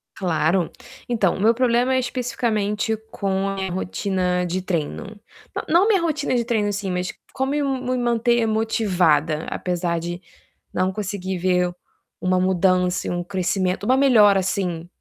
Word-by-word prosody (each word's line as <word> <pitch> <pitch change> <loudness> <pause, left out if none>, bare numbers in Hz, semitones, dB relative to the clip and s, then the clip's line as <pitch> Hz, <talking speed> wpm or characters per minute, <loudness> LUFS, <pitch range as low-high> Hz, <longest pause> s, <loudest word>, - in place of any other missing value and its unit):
Claro. 170 0 +1 0.4
Então, 215 -7 +1
meu 220 +4 +4
problema 250 +1 +2
é - - +3
especificamente 225 -4 -1 0.2
com 195 -1 -1
a 195 - -3
minha 190 -1 -3
rotina 180 0 -1
de 180 +2 -2
treino. 185 +4 -4 0.4
Na - - -2
não 345 +6 +4
minha 405 -5 +3
rotina 305 -5 0
de 235 -1 +1
treino 220 -3 +1
em - - 0
si, 200 -1 -3
mas 180 0 -2 0.2
como 265 +1 -1
me 295 +1 0
me 255 -2 -1
manter 240 -1 +2
motivada, 180 -9 +1
apesar 175 -1 -2
de 175 +1 -5 0.5
não 185 +1 0
conseguir 190 -2 -4
ver 180 0 +1 0.5
uma 185 0 +2
mudança 185 0 +2
e - - -1
um 175 0 -2
crescimento 185 +1 -1
uma 255 +4 +3
melhora 215 -8 +6
assim 180 -3 -2
195 Hz, 155 wpm, -22 LUFS, 180-235 Hz, 0.5 s, melhora